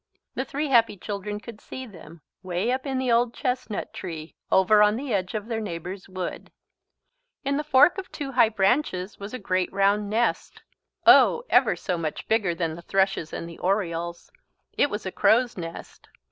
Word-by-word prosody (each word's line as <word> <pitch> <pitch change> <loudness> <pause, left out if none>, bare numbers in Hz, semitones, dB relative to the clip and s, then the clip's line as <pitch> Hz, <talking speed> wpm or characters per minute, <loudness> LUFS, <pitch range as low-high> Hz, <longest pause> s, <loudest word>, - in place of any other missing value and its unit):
The 260 - -3
three 290 +2 -3
happy 230 -5 +4
children 205 +2 -5
could 225 -1 -11
see 260 - -8
them 170 -6 -13 0.2
way 185 +5 -1
up 260 +2 -2
in 265 -1 -1
the 260 -2 0
old 235 0 +2
chestnut 250 -4 -3
tree 165 -3 -7 0.2
over 210 +3 +5
on 210 0 +5
the 260 0 -3
edge 190 +1 -1
of 210 -1 -3
their 225 -1 -3
neighbour's 185 0 -6
wood. 185 -1 -6 0.9
In 280 +1 +1
the 300 - -1
fork 295 +5 +5
of 380 - -9
two 285 -3 -5
high 240 -4 +4
branches 200 -2 0
was 200 +1 -7
a 255 - -4
great 185 -4 -1
round 200 +1 +2
nest 230 +3 -1 0.4
oh 475 - +7
ever - - +4
so 180 -3 -3
much 155 -2 -4
bigger 205 -6 +1
than 165 -2 -2
the 170 - -9
thrush's 190 -3 0
and 165 - -5
the 170 - -11
oriole's. 170 -3 -2 0.4
It 285 - +3
was 210 -3 -5
a 190 - -3
crow's 240 +5 +3
nest. 165 -2 -9
205 Hz, 185 wpm, -25 LUFS, 185-245 Hz, 0.9 s, oh